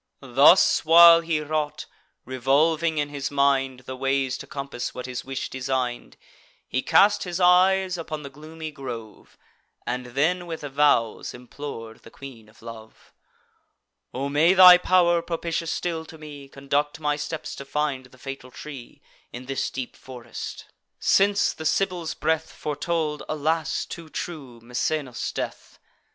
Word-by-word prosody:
Thus 140 Hz, +8 st, +6 dB
while 170 Hz, +1 st, +8 dB
he 165 Hz, -2 st, -1 dB
wrought, 150 Hz, -1 st, -3 dB, 0.4 s
revolving 150 Hz, +6 st, +1 dB
in 145 Hz, -1 st, -1 dB
his 140 Hz, -1 st, -4 dB
mind 135 Hz, -2 st, +1 dB
The 130 Hz, 0 st, -8 dB
ways 135 Hz, 0 st, 0 dB
to -, -, -9 dB
compass 140 Hz, -3 st, -5 dB
what 125 Hz, -, -6 dB
his 125 Hz, -1 st, -5 dB
wish 135 Hz, 0 st, -4 dB
design'd, 130 Hz, -2 st, -3 dB, 0.5 s
He 130 Hz, -, -1 dB
cast 205 Hz, +7 st, +4 dB
his 180 Hz, -1 st, -4 dB
eyes 185 Hz, 0 st, +4 dB
upon 155 Hz, -2 st, -6 dB
the 140 Hz, -, -9 dB
gloomy 155 Hz, +2 st, -9 dB
grove, 120 Hz, -6 st, -9 dB, 0.5 s
And 125 Hz, 0 st, -3 dB
then 165 Hz, +8 st, 0 dB
with 165 Hz, -1 st, -6 dB
vows 140 Hz, -7 st, +1 dB
implor'd 120 Hz, -3 st, -9 dB
the -, -, -14 dB
Queen 115 Hz, -4 st, -12 dB
of 110 Hz, -, -21 dB
Love: 110 Hz, -1 st, -12 dB, 1.0 s
"O 135 Hz, +2 st, -3 dB
may 155 Hz, +6 st, +3 dB
thy 180 Hz, -1 st, +10 dB
pow'r, 175 Hz, -2 st, +3 dB
propitious 165 Hz, -1 st, -3 dB
still 165 Hz, -2 st, -3 dB
to 160 Hz, -, -12 dB
me, 145 Hz, -3 st, -11 dB
Conduct 140 Hz, +2 st, -2 dB
my 150 Hz, -1 st, 0 dB
steps 155 Hz, +1 st, -5 dB
to -, -, -7 dB
find 140 Hz, -2 st, -2 dB
the 130 Hz, -, -20 dB
fatal 135 Hz, -1 st, -8 dB
tree, 135 Hz, -2 st, -11 dB, 0.3 s
In 125 Hz, +1 st, -8 dB
this 135 Hz, +1 st, -2 dB
deep 130 Hz, -2 st, -6 dB
forest; 125 Hz, -2 st, -9 dB, 0.3 s
since 200 Hz, +1 st, +3 dB
the 160 Hz, -, -9 dB
Sibyl's 175 Hz, 0 st, -1 dB
breath 160 Hz, 0 st, -1 dB
Foretold, 150 Hz, 0 st, -3 dB
alas! 155 Hz, +1 st, -1 dB
too 165 Hz, -2 st, -9 dB
true, 140 Hz, -9 st, -7 dB
Misenus' 125 Hz, +2 st, -3 dB
death." -, -, -6 dB
145 Hz, 145 wpm, -24 LUFS, 130-165 Hz, 1.0 s, thy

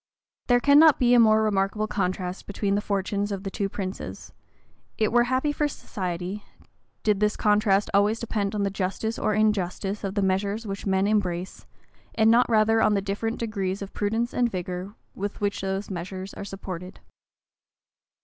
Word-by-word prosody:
There 245 Hz, -1 st, +5 dB
cannot 290 Hz, +3 st, +6 dB
be 245 Hz, -1 st, +3 dB
a 245 Hz, -, +7 dB
more 220 Hz, -1 st, +5 dB
remarkable 210 Hz, 0 st, 0 dB
contrast 185 Hz, -3 st, -3 dB
between 200 Hz, 0 st, -1 dB
the 205 Hz, -, +1 dB
fortunes 200 Hz, 0 st, -1 dB
of 195 Hz, -1 st, -4 dB
two 195 Hz, 0 st, -2 dB
princes: 190 Hz, -1 st, -6 dB, 0.6 s
it 215 Hz, -1 st, +1 dB
were 240 Hz, 0 st, +4 dB
happy 260 Hz, +4 st, +1 dB
for 295 Hz, 0 st, 0 dB
society, 185 Hz, -5 st, -5 dB, 0.6 s
did 210 Hz, -2 st, +2 dB
this 210 Hz, 0 st, +1 dB
contrast 205 Hz, -1 st, +2 dB
always 205 Hz, +3 st, +3 dB
depend 215 Hz, -3 st, -2 dB
on 205 Hz, -, 0 dB
the 200 Hz, -, 0 dB
justice 200 Hz, +4 st, -2 dB
or 215 Hz, -, +1 dB
injustice 205 Hz, -1 st, 0 dB
of 195 Hz, 0 st, -3 dB
the 200 Hz, -, +1 dB
measures 200 Hz, +4 st, 0 dB
which 200 Hz, 0 st, -5 dB
men 190 Hz, 0 st, +2 dB
embrace; 185 Hz, -4 st, -1 dB, 0.5 s
and 220 Hz, 0 st, +5 dB
not 240 Hz, +2 st, +4 dB
rather 225 Hz, 0 st, +4 dB
on 210 Hz, -, +3 dB
the 200 Hz, -, +1 dB
different 215 Hz, +4 st, -2 dB
degrees 200 Hz, -4 st, -3 dB
of 200 Hz, -, -10 dB
prudence 225 Hz, +3 st, -1 dB
and 245 Hz, -1 st, +2 dB
vigor 185 Hz, +1 st, -5 dB, 0.2 s
with 205 Hz, +1 st, -5 dB
which 205 Hz, 0 st, -1 dB
those 195 Hz, +1 st, -3 dB
measures 185 Hz, +2 st, -6 dB
are -, -, -7 dB
supported. 185 Hz, -2 st, -7 dB
205 Hz, 170 wpm, -25 LUFS, 195-220 Hz, 0.6 s, a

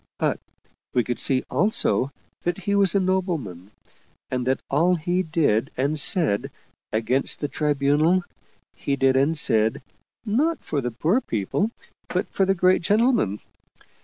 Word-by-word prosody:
But -, -, 0 dB, 0.6 s
we 125 Hz, -, +3 dB
could 120 Hz, 0 st, -3 dB
see 130 Hz, -1 st, +1 dB
also 150 Hz, -, +1 dB, 0.3 s
that 175 Hz, 0 st, -2 dB
he 200 Hz, +1 st, -2 dB
was 200 Hz, -2 st, +3 dB
a -, -, +4 dB
nobleman, 170 Hz, -, -2 dB, 0.6 s
and 125 Hz, -1 st, -2 dB
that 130 Hz, -, +1 dB
all 170 Hz, +6 st, +2 dB
that 160 Hz, -, -8 dB
he 180 Hz, +1 st, +1 dB
did 155 Hz, -, 0 dB
and 145 Hz, +4 st, 0 dB
said 140 Hz, -, +3 dB, 0.4 s
against 120 Hz, +5 st, 0 dB
the 145 Hz, -, -2 dB
Tribunal, 150 Hz, +5 st, +1 dB, 0.5 s
he 140 Hz, -, -2 dB
did 135 Hz, -1 st, +2 dB
and 140 Hz, +5 st, +2 dB
said 110 Hz, -5 st, +2 dB, 0.5 s
not 290 Hz, +10 st, +1 dB
for 145 Hz, -3 st, -3 dB
the 125 Hz, -, -2 dB
poor 160 Hz, -, 0 dB
people 115 Hz, -, -1 dB, 0.4 s
but -, -, -2 dB
for 195 Hz, -, 0 dB
the 195 Hz, -, +2 dB
great 185 Hz, +1 st, +3 dB
gentlemen. 210 Hz, -, +1 dB
155 Hz, 150 wpm, -23 LUFS, 130-185 Hz, 0.6 s, a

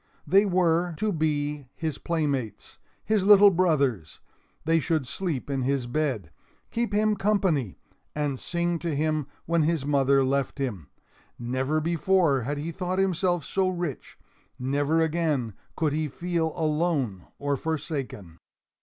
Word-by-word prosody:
They 195 Hz, +7 st, +5 dB
were 175 Hz, -2 st, +2 dB
to 215 Hz, +2 st, 0 dB
be 150 Hz, -3 st, -1 dB
his 160 Hz, -4 st, -3 dB
playmates, 145 Hz, -9 st, -3 dB, 0.3 s
his 215 Hz, -3 st, +2 dB
little 205 Hz, 0 st, +8 dB
brothers; 140 Hz, -, +1 dB, 0.5 s
they 165 Hz, +1 st, +3 dB
should 160 Hz, -2 st, 0 dB
sleep 160 Hz, 0 st, -3 dB
in 135 Hz, -2 st, -1 dB
his 135 Hz, 0 st, 0 dB
bed, 120 Hz, -, -2 dB, 0.4 s
keep 235 Hz, 0 st, -1 dB
him 210 Hz, +1 st, +2 dB
company, 190 Hz, -, 0 dB, 0.4 s
and 145 Hz, -3 st, -1 dB
sing 170 Hz, -1 st, -1 dB
to 165 Hz, -3 st, -2 dB
him 155 Hz, -1 st, 0 dB, 0.2 s
when 170 Hz, 0 st, +2 dB
his 155 Hz, -2 st, 0 dB
mother 140 Hz, -1 st, +3 dB
left 135 Hz, 0 st, 0 dB
him. 105 Hz, -, -4 dB, 0.5 s
Never 130 Hz, +5 st, -1 dB
before 165 Hz, -3 st, +2 dB
had 145 Hz, +5 st, -3 dB
he 155 Hz, +3 st, -4 dB
thought 180 Hz, +1 st, -3 dB
himself 180 Hz, -4 st, +1 dB
so 190 Hz, +3 st, +1 dB
rich; 175 Hz, -6 st, -5 dB, 0.4 s
never 145 Hz, +5 st, +1 dB
again 155 Hz, -8 st, 0 dB, 0.2 s
could 155 Hz, -3 st, +1 dB
he 155 Hz, 0 st, 0 dB
feel 165 Hz, +2 st, -2 dB
alone 150 Hz, -, -1 dB
or 145 Hz, 0 st, -1 dB
forsaken. 140 Hz, -, -4 dB
155 Hz, 135 wpm, -26 LUFS, 135-175 Hz, 0.5 s, little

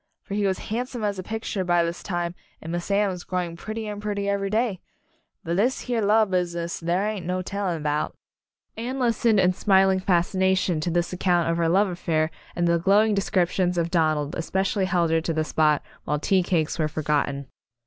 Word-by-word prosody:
For -, -, -7 dB
he 205 Hz, -1 st, +1 dB
was 190 Hz, -1 st, 0 dB, 0.2 s
handsome 245 Hz, 0 st, -3 dB
as 200 Hz, -2 st, -1 dB
a -, -, -1 dB
picture 220 Hz, -1 st, -3 dB
by 175 Hz, -1 st, +3 dB
this 170 Hz, +1 st, -3 dB
time 175 Hz, -2 st, -2 dB, 0.3 s
and 165 Hz, -, -7 dB
Miss 175 Hz, +2 st, -3 dB
Anne 200 Hz, 0 st, +2 dB
was 180 Hz, -1 st, -7 dB
growing 180 Hz, -2 st, -3 dB
pret 215 Hz, +6 st, -7 dB
tier 215 Hz, -2 st, -3 dB
and 205 Hz, -, -8 dB
prettier 200 Hz, -1 st, -1 dB
every 195 Hz, 0 st, -1 dB
day 215 Hz, -3 st, 0 dB, 0.6 s
but 170 Hz, +1 st, -2 dB
this 245 Hz, +6 st, +1 dB
here 245 Hz, -2 st, -1 dB
An 210 Hz, -, 0 dB
Announcement -, -, +1 dB
Party 220 Hz, +1 st, +6 dB
love 215 Hz, -3 st, +2 dB
business 170 Hz, -1 st, -4 dB
there 175 Hz, +4 st, 0 dB
ain't 210 Hz, -5 st, -4 dB
no 185 Hz, 0 st, -1 dB
telling 180 Hz, -5 st, -3 dB
'bout." 150 Hz, 0 st, -1 dB, 0.6 s
Anne 245 Hz, +4 st, -4 dB
listened 230 Hz, -3 st, +2 dB
in 185 Hz, -1 st, +4 dB
smiling 190 Hz, 0 st, +3 dB
fascination 185 Hz, -1 st, +1 dB
to 155 Hz, -, -1 dB
this 175 Hz, +1 st, 0 dB
account 175 Hz, -2 st, +2 dB
of 165 Hz, -, -1 dB
her 165 Hz, -1 st, +2 dB
love 195 Hz, +4 st, +4 dB
affai'r 165 Hz, -3 st, -1 dB, 0.2 s
and 175 Hz, 0 st, +1 dB
the 170 Hz, 0 st, +3 dB
glowing 205 Hz, +5 st, +4 dB
descriptions 185 Hz, -2 st, +1 dB
of 170 Hz, 0 st, 0 dB
Donald 155 Hz, -4 st, +1 dB
espe 175 Hz, +3 st, -1 dB
cially 195 Hz, 0 st, 0 dB
held 175 Hz, -3 st, +1 dB
her 165 Hz, 0 st, +3 dB
to 165 Hz, 0 st, -2 dB
the 155 Hz, 0 st, 0 dB
spot 155 Hz, -1 st, +2 dB, 0.2 s
while 150 Hz, -, 0 dB
tea 185 Hz, +5 st, +2 dB
cakes 170 Hz, -2 st, 0 dB
were 155 Hz, -, +2 dB
forgotten. 145 Hz, -2 st, -1 dB
180 Hz, 215 wpm, -25 LUFS, 170-200 Hz, 0.6 s, Party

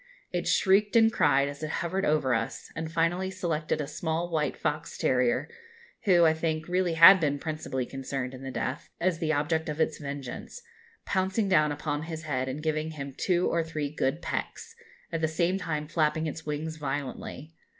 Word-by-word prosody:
It -, -, -2 dB
shrieked 200 Hz, +2 st, +3 dB
and 225 Hz, -1 st, +6 dB
cried, 140 Hz, -1 st, +3 dB
as 145 Hz, +1 st, -7 dB
it 155 Hz, -, -3 dB
hovered 185 Hz, +5 st, -1 dB
over 150 Hz, -4 st, +2 dB
us, 115 Hz, 0 st, -3 dB
and 160 Hz, 0 st, -4 dB
finally 170 Hz, +3 st, +1 dB
selected 165 Hz, -6 st, -2 dB
a 150 Hz, -, -1 dB
small 160 Hz, +3 st, -2 dB
white 150 Hz, -4 st, 0 dB
fox 150 Hz, +2 st, -3 dB
terrier, 125 Hz, -1 st, +2 dB, 0.6 s
who, 175 Hz, -4 st, +6 dB
I 160 Hz, -, +5 dB
think, 160 Hz, -1 st, -2 dB
really 180 Hz, -1 st, +1 dB
had 170 Hz, +4 st, +10 dB
been 145 Hz, -3 st, +1 dB
principally 155 Hz, -4 st, -3 dB
concerned 135 Hz, -1 st, -4 dB
in 130 Hz, -, -9 dB
the 135 Hz, -, -5 dB
death, 130 Hz, +2 st, -4 dB
as 175 Hz, -2 st, +1 dB
the 160 Hz, -1 st, 0 dB
object 155 Hz, +2 st, 0 dB
of 150 Hz, +1 st, -4 dB
its 160 Hz, -1 st, +1 dB
vengeance, 140 Hz, -, -7 dB, 0.4 s
pouncing 190 Hz, +2 st, 0 dB
down 155 Hz, -6 st, +4 dB
upon 145 Hz, 0 st, -2 dB
his 160 Hz, 0 st, -6 dB
head, 130 Hz, -4 st, -1 dB
and 145 Hz, +4 st, -5 dB
giving 155 Hz, 0 st, -1 dB
him 140 Hz, -3 st, -6 dB
two 180 Hz, -1 st, +1 dB
or 165 Hz, 0 st, +1 dB
three 155 Hz, -3 st, -4 dB
good 150 Hz, +2 st, -1 dB
pecks, 465 Hz, -, -4 dB, 0.4 s
at 165 Hz, -1 st, -2 dB
the 160 Hz, -, +2 dB
same 170 Hz, +4 st, 0 dB
time 150 Hz, -4 st, -3 dB
flapping 160 Hz, 0 st, +1 dB
its 155 Hz, 0 st, -5 dB
wings 155 Hz, +2 st, -3 dB
violently. 145 Hz, +1 st, -5 dB
155 Hz, 185 wpm, -28 LUFS, 145-170 Hz, 0.6 s, had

